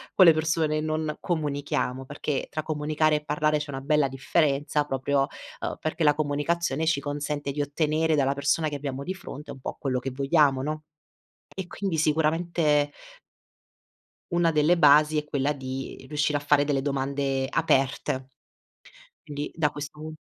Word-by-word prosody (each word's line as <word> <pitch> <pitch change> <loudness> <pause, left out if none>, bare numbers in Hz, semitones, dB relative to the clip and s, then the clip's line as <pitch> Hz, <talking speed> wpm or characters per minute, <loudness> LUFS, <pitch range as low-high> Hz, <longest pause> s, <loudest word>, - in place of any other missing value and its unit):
con 185 - +8
le 165 - +9
persone 155 -1 +1
e - - -1
non 155 0 -2
comunichiamo, 145 -5 -2
perché 145 0 -3
tra 155 0 -3
comunicare 155 0 +1
e 150 - -7
parlare 150 0 +1
c'è 145 - -6
una 135 -1 -5
bella 150 0 +2
differenza 145 +2 +1
proprio, 135 0 0 0.3
ehm, - - -4
perché 155 +1 -2
la 150 -1 +5
comunicazione 155 +1 0
ci 160 -4 +2
consente 145 0 -3
di 145 +2 -2
ottenere 155 +2 +1
dalla 140 -2 +2
persona 145 +3 +1
che 150 - -5
abbiamo 140 -1 -4
di 185 - -3
fronte 150 -5 -9
un 130 - -9
po' - - -6
quello 130 -2 -1
che 135 - -4
vogliamo, 135 0 +2
no, 155 +1 -3 0.7
e 190 -2 -5
quindi 185 -4 -3
sicuramente 155 -1 +2 1.4
una 170 -1 +3
delle 155 +3 +3
basi 150 0 +6
è 150 - 0
quella 145 0 0
di 135 -1 -6
riuscire 150 0 0
a - - -5
fare 145 0 +3
delle 140 -2 0
domande 135 -1 -1
aperte. 135 -4 0 0.9
Quindi, 145 -2 -5
da 155 -3 +2
questo 145 +1 -8
pun 155 0 -7
150 Hz, 165 wpm, -26 LUFS, 140-155 Hz, 1.4 s, le